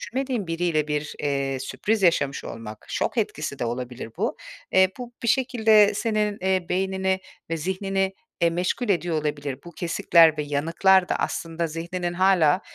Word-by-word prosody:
düşünmediğin 255 -3 -3
biriyle 165 -2 0
bir, 150 0 -2
eee, 140 -2 -1
sürpriz 210 +10 -1
yaşamış 140 -6 +2
olmak, 110 -2 -8
şok - - -2
etkisi - - -2
de - - -1
olabilir 120 0 -5
bu. 220 +6 -1 0.4
Eee, 190 0 +6
bu 245 -1 -7
bir 235 - -1
şekilde 220 -5 +4
senin, 210 -1 0
eee, 185 -1 0
beynini 190 0 0 0.3
ve 165 - 0
zihnini, 190 +3 -1 0.3
eee, 170 - +4
meşgul 180 +8 -1
ediyor 175 -4 +1
olabilir. 145 -3 -3
Bu 175 - -10
kesikler 170 -2 +4
ve - - +1
yanıklar 165 +6 +3
da - - +1
aslında 165 0 -2
zihninin 175 +2 -4
hâlâ, 180 -3 +4
175 Hz, 155 wpm, -24 LUFS, 150-195 Hz, 0.4 s, Eee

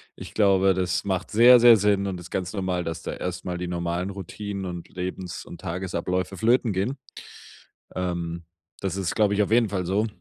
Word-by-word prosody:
ich - - -10
glaube, 95 -2 +4
das 90 -1 -1
macht 95 -2 -2
sehr, 120 +3 +8
sehr 120 -1 +8
Sinn 100 -1 +2
und 90 -2 -4
ist 85 - -11
ganz 90 +1 -3
normal, 95 -3 -1
dass 80 0 -5
da - - -4
erstmal 90 0 -4
die 90 0 -4
normalen 85 +2 -2
Routinen 100 +1 -6
und 85 -1 -6
Lebens 90 0 -5
und 85 - -10
Tagesabläufe 90 +1 -3
flöten 115 0 +2
gehen. 110 +9 -1 1.0
Ähm, 85 -2 -3 0.4
das 95 -2 -3
ist, 95 -3 -2
glaube 105 -2 +3
ich, 105 +1 +3
auf 105 - -4
jeden 115 -2 +4
Fall 95 -3 -2
so. 105 +5 +1
95 Hz, 190 wpm, -25 LUFS, 90-100 Hz, 1.0 s, sehr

